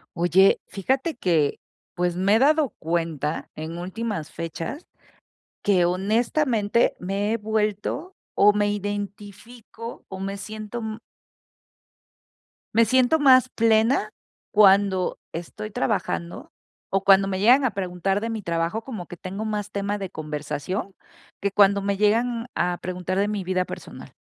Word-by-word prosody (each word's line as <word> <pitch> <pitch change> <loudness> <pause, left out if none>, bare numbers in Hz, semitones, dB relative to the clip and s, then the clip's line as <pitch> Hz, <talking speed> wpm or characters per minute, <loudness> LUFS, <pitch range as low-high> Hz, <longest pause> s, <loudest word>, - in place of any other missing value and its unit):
Oye, 175 +3 +4
fíjate 265 - -1
que, 165 - +1 0.4
pues, 175 -1 0
me 190 +3 +3
he - - +4
dado 300 +1 +4
cuenta, 165 -2 -2
en 160 +2 -6
últimas 190 -3 -4
fechas 165 - -6 0.7
que 190 -3 +3
honestamente 220 - +1
me 200 +4 -1
he - - +1
vuelto, 215 - -2 0.2
o 205 +1 +5
me 205 0 +1
identifico, 205 +3 -7
o 190 -1 -7
me 195 +1 -3
siento 215 +2 -7
m. 220 -1 -5 1.8
Me 230 0 +6
siento 255 +6 +3
más 255 -3 +6
plena, 225 -1 +2 0.4
cuando 195 -2 +4
estoy 195 +6 -6
trabajando, 170 0 -2 0.4
o 195 0 0
cuando 195 0 +5
me 190 -1 -2
llegan 250 +7 +5
a 250 - +1
preguntar 190 +1 -1
de 230 +2 -3
mi 220 - -4
trabajo, 170 +4 -1
como 220 -9 -6
que 175 - -9
tengo 195 +5 -6
más 210 -1 -3
tema 200 0 -2
de 195 -2 -4
conversación, 150 +6 -4 0.4
que 200 - -1
cuando 200 0 +4
me 200 0 0
llegan 230 +3 +1
a 175 0 0
preguntar 185 +1 -3
de 200 - +2
mi 210 -2 -2
vida 185 0 0
personal. - - -10
200 Hz, 140 wpm, -24 LUFS, 180-220 Hz, 1.8 s, Me